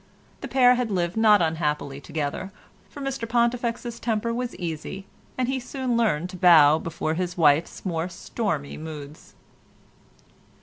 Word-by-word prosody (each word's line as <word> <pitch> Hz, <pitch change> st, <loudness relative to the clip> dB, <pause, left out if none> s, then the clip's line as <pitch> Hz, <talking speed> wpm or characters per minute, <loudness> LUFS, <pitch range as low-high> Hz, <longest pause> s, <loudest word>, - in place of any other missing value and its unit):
The -, -, -6 dB
pair 250 Hz, -2 st, +5 dB
had 250 Hz, -2 st, -1 dB
lived 175 Hz, -3 st, -1 dB
not 215 Hz, -4 st, +5 dB
unhappily 150 Hz, -3 st, -2 dB
together, 155 Hz, +6 st, -4 dB, 0.4 s
for 285 Hz, -, -10 dB
Mr 270 Hz, -4 st, -4 dB
Pontifex's 235 Hz, 0 st, 0 dB
temper 230 Hz, 0 st, -1 dB
was 245 Hz, 0 st, -3 dB
easy 175 Hz, +3 st, -5 dB, 0.3 s
and 255 Hz, -1 st, 0 dB
he 265 Hz, 0 st, -1 dB
soon 255 Hz, -1 st, -3 dB
learned 185 Hz, -7 st, +1 dB
to 185 Hz, -, -8 dB
bow 160 Hz, -4 st, +7 dB
before 160 Hz, -1 st, -3 dB
his 180 Hz, +1 st, -3 dB
wife's 155 Hz, +2 st, +2 dB
more 170 Hz, -1 st, -2 dB
stormy 175 Hz, -5 st, -4 dB
moods. 150 Hz, -2 st, -9 dB
185 Hz, 140 wpm, -25 LUFS, 160-235 Hz, 0.4 s, bow